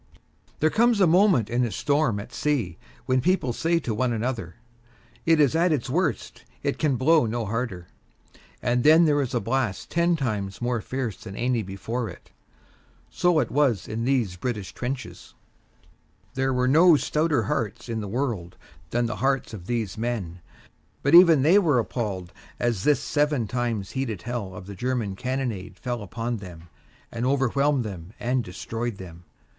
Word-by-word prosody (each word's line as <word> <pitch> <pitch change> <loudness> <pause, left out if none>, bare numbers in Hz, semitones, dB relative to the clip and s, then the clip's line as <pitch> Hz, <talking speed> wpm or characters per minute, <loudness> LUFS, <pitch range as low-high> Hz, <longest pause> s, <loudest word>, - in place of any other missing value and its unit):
There 155 +1 +3
comes 235 -1 +3
a 190 - +6
moment 175 - +4
in 120 +2 0
a 120 - 0
storm 145 -6 +1
at 110 +4 -9
sea 115 - -1 0.3
when 130 0 +2
people 170 -8 +1
say 165 +6 +1
to 115 - -2
one 120 +3 0
another, 115 -6 -3 0.7
"It 165 -1 +5
is 145 0 +4
at 170 +2 +3
its 135 -4 -1
worst; 160 - -1 0.2
it - - -1
can 150 -4 +2
blow 145 +1 +4
no 115 +1 -2
harder," 105 -5 -3 0.8
and 120 0 +1
then 160 +3 +7
there 145 -2 +3
is 125 -2 -3
a - - +2
blast 120 -6 -2
ten 170 0 +2
times 105 -9 -3
more 120 -1 -1
fierce 125 -6 -4
than 95 - -9
any 120 0 0
before 110 +5 -4
it. - - -13 0.8
So 175 -2 +2
it 130 -7 +1
was 130 -7 +1
in 110 +2 -3
these 120 -8 0
British 105 -2 -4
trenches. 125 +1 -6 1.0
There 135 0 0
were 125 0 +1
no 165 +5 +6
stouter 155 +1 +1
hearts 120 -5 -3
in 115 -2 -3
the 105 - -5
whole 100 - -6
world 105 -11 -3 0.3
than 120 +4 0
the 115 - -3
hearts 135 -3 0
of 95 -4 -9
these 110 -5 -2
men; 105 -8 -3 0.6
but 140 - +2
even 170 -5 +8
they 175 +7 +6
were 155 -9 +2
appalled 100 -6 -3 0.3
as 115 -5 -1
this 150 -1 +3
seven 145 -5 +1
times 115 -4 -2
heated 115 -9 -3
hell 115 -6 -4
of 90 0 -9
the 100 - -8
German 115 -2 -2
cannonade 125 -4 -3
fell 120 -2 -4
upon 115 +4 -4
them 85 -4 -11 0.4
and 115 0 -4
overwhelmed 140 +1 +2
them 95 -2 -8
and 125 +1 0
destroyed 115 +4 -5
them. 85 -2 -11
120 Hz, 170 wpm, -25 LUFS, 110-140 Hz, 1.0 s, even